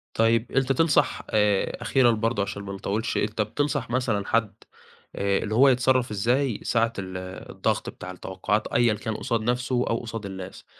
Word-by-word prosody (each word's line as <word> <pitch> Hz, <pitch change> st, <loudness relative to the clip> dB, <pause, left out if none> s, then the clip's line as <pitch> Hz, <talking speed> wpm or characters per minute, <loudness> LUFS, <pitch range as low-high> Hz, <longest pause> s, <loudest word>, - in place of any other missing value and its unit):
طيب 115 Hz, +1 st, +2 dB
أنت 135 Hz, 0 st, +1 dB
تنصح 150 Hz, +3 st, +2 dB
آآ، 105 Hz, -2 st, +2 dB
أخيرًا 130 Hz, -3 st, +4 dB
برضه 115 Hz, -1 st, 0 dB
عشان 100 Hz, 0 st, -5 dB
ما 100 Hz, 0 st, -6 dB
نطوّلش، 105 Hz, +5 st, -2 dB
أنت 105 Hz, +1 st, 0 dB
بتنصح 145 Hz, +3 st, -1 dB
مثلًا 120 Hz, -5 st, 0 dB
حَد 115 Hz, -3 st, +1 dB, 0.6 s
آآ 100 Hz, 0 st, +1 dB
اللي 110 Hz, 0 st, -2 dB
هو 135 Hz, +4 st, +6 dB
يتصرّف 125 Hz, -1 st, +2 dB
إزاي 120 Hz, +3 st, +1 dB
ساعة 115 Hz, 0 st, +1 dB
ال 95 Hz, -1 st, -5 dB, 0.3 s
الضغط -, -, -1 dB
بتاع 90 Hz, -, -8 dB
التوقّعات، 95 Hz, +3 st, -2 dB
أيًا 120 Hz, -2 st, +3 dB
كان 110 Hz, +1 st, -4 dB
قصاد 115 Hz, +1 st, -1 dB
نَفْسه 125 Hz, +2 st, 0 dB
أو 115 Hz, -, +1 dB
قصاد 115 Hz, -2 st, -6 dB
الناس؟ 95 Hz, -1 st, -8 dB
115 Hz, 165 wpm, -25 LUFS, 100-125 Hz, 0.6 s, هو